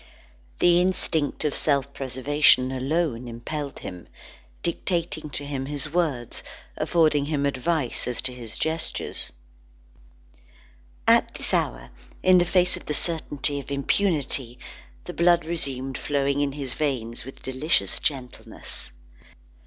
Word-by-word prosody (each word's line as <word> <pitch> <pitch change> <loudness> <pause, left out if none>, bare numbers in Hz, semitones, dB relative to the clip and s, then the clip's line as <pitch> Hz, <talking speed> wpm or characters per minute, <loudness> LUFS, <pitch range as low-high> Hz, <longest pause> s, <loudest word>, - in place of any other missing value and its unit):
The 175 0 +5
instinct 165 -5 +1
of 150 - +1
self 140 -2 +1
preservation 130 0 +3
alone 130 -2 -1
impelled 140 +5 -5
him, 90 -1 -8 0.6
dictating 170 -2 -1
to 145 0 -3
him 135 -2 -3
his 145 +1 -2
words, 145 -10 0 0.3
affording 155 -4 +3
him 145 -2 0
advice 140 0 0
as 125 - -2
to 130 -1 -3
his 120 -3 -6
gestures. 160 0 -2 1.8
At - - +4
this - - 0
hour, - - 0 0.3
in 185 -1 +7
the 175 - +3
face 180 +1 +3
of - - -10
the 150 - 0
certainty 145 -4 0
of 140 - -9
impunity, 140 -4 0 0.5
the - - -7
blood 170 -1 +4
resumed 135 -5 -2
flowing 140 0 +1
in 140 -1 0
his 135 -3 -4
veins 125 -6 -2
with 135 - -11
delicious 130 +5 +2
gentleness. 130 -4 -4
145 Hz, 125 wpm, -25 LUFS, 130-160 Hz, 1.8 s, in